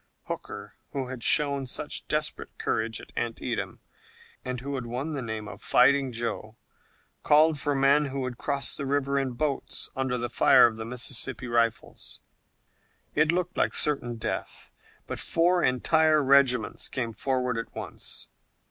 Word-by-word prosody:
Hooker, - - -7 0.2
who 135 -2 -3
had 130 -2 -6
shown 140 -2 +3
such - - -3
desperate - - -2
courage 110 0 -1
at - - -13
Antietam 115 -1 -3 0.6
and 125 -1 -4
who 140 +3 -5
had 130 -3 -4
won 130 +7 -3
the 140 - -3
name 110 -2 -5
of - - -10
Fighting 135 +1 +4
Joe, 115 -1 -4 0.6
called 155 0 +4
for 145 0 0
men 140 +2 +4
who 135 0 -4
would 125 -2 -5
cross 140 -1 +1
the 140 - -3
river 140 0 +1
in 135 -2 -2
boats 140 +2 -2
under 130 -1 -1
the 120 0 -2
fire 120 - +6
of 115 -2 +1
the 110 - -5
Mississippi 125 +1 -3
rifles. 115 -1 -1 0.9
It 155 +1 +3
looked 180 +1 -1
like - - +1
certain 135 -5 +2
death, 110 - -5 0.3
but - - -5
four 175 +2 +2
entire 155 +4 +3
regiments 135 -2 +3
came 115 -3 -3
forward 125 0 -1
at 115 - -7
once. - - -7
130 Hz, 155 wpm, -27 LUFS, 120-145 Hz, 0.9 s, fire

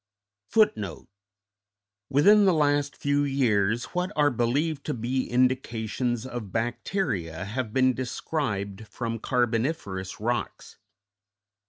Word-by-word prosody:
_Within 110 - +1 1.4
the 185 -3 +4
last 145 -1 +1
few 145 0 +1
years 120 -5 +1
what 180 +1 -1
are 145 -1 +4
believed 140 +6 0
to - - -1
be 125 +3 -2
indications 120 -1 0
of 120 -6 -6
bacteria 110 - -2
have 110 +2 -3
been 130 +1 +3
described 110 -6 -3
from 115 +3 -4
carboniferous 115 - -1
rocks. 120 +3 -3
120 Hz, 100 wpm, -26 LUFS, 110-140 Hz, 1.4 s, the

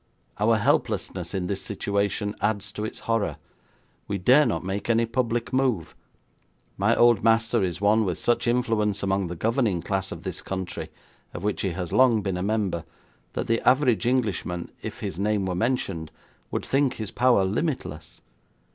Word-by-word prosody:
Our 110 +2 +4
helplessness 95 -3 0
in 95 -2 -1
this 95 +1 -2
situation 100 0 -1
adds 105 -2 0
to 105 - -5
its 110 - -5
horror. 105 - 0 0.7
We 100 - -1
dare 130 +10 +5
not 115 - -1
make 95 +4 -4
any 115 0 +3
public 115 0 -1
move. 130 - 0 0.8
My - - +2
old 120 -4 +5
master 115 +1 +3
is 90 -2 -1
one 105 +2 +4
with 90 -4 -1
such 120 0 +1
influence 110 -4 +1
among 95 -1 +1
the 90 - -5
governing 110 -2 0
class 95 -1 -2
of 85 - -7
this 95 -3 -4
country, 95 -2 -5 0.5
of 90 - -6
which 105 -1 -1
he 95 -3 -1
has 90 -1 -4
long 120 -5 +4
been 95 -2 -1
a - - -3
member, 100 -4 -1 0.5
that - - -2
the 115 0 +1
average 125 -3 +3
Englishman, 105 -8 -1
if - - -7
his 85 - -4
name 105 -1 +1
were 95 - -1
mentioned, 95 -6 -1 0.4
would - - -3
think 135 -1 +1
his 110 -3 -5
power 120 -6 +3
limitless. 100 - -3
105 Hz, 170 wpm, -25 LUFS, 95-115 Hz, 0.8 s, dare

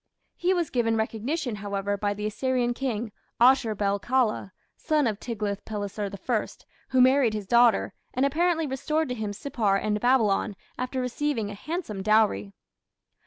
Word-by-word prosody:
He 355 +2 +1
was 345 -4 0
given 230 -2 +1
recognition, 225 +3 -2
however, 200 0 -2
by 205 0 -1
the 210 +1 -4
Assyrian 245 +2 0
king, 240 -4 -3 0.3
Ashur 240 -3 +5
bel 200 0 0
kala, 240 -4 0 0.2
son 305 -2 +1
of 215 -3 -1
Tiglath 210 -4 -3
pileser 205 -1 -4 0.2
I, 235 -4 +1 0.4
who 260 -1 +4
married 255 -3 +4
his 210 -2 -4
daughter, 235 +1 +4 0.2
and 260 +2 +1
apparently 325 +3 +1
restored 300 +3 -1
to - - -1
him 220 -4 -3
Sippar 215 -2 0
and 210 +1 -1
Babylon 225 -5 +2 0.2
after 255 +1 -3
receiving 250 -3 -1
a - - -6
handsome 260 - -5
dowry. 205 - +2
230 Hz, 155 wpm, -26 LUFS, 205-265 Hz, 0.4 s, Ashur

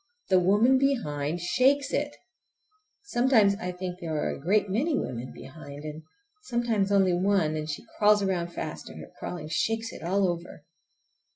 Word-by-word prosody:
The 185 -1 +5
woman 210 +8 +4
behind 170 - 0
shakes 270 +10 +2
it! 290 0 -1 0.9
Sometimes 240 - +4
I 180 -4 -4
think 180 0 -6
there 165 -3 -4
are 150 - 0
a - - -6
great 205 +6 +2
many 270 - 0
women 125 +1 -4
behind, 145 0 -10
and 155 +1 -6 0.4
sometimes 235 - 0
only 195 -2 +4
one, 180 -4 +2
and 155 0 -4
she 150 - -5
crawls 210 -1 +5
around 180 -3 0
fast, - - -6
and - - -10
her - - -11
crawling 165 -4 -5
shakes 225 +7 -1
it - - -10
all 190 +3 +1
over. 170 -3 -5
190 Hz, 165 wpm, -27 LUFS, 165-225 Hz, 0.9 s, The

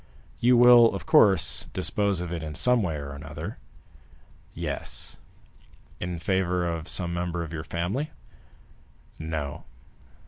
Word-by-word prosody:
"You 125 +1 +5
will, 120 -2 +7
of 95 - -6
course, 95 -5 +4
dispose 100 -4 0
of 90 -1 -5
it 85 - -3
in 75 -1 -6
some 125 +4 +3
way 85 -6 -1
or 70 -1 -6
other?" 80 +8 -7 0.9
"Yes." - - -4 0.8
"In 85 0 -4
favor 90 0 0
of 85 -1 -4
some 85 -2 -1
member 85 0 -2
of 80 0 -8
your 80 -1 -4
family?" 90 - -2 1.1
"No." 80 -3 -4
85 Hz, 130 wpm, -26 LUFS, 80-100 Hz, 1.1 s, will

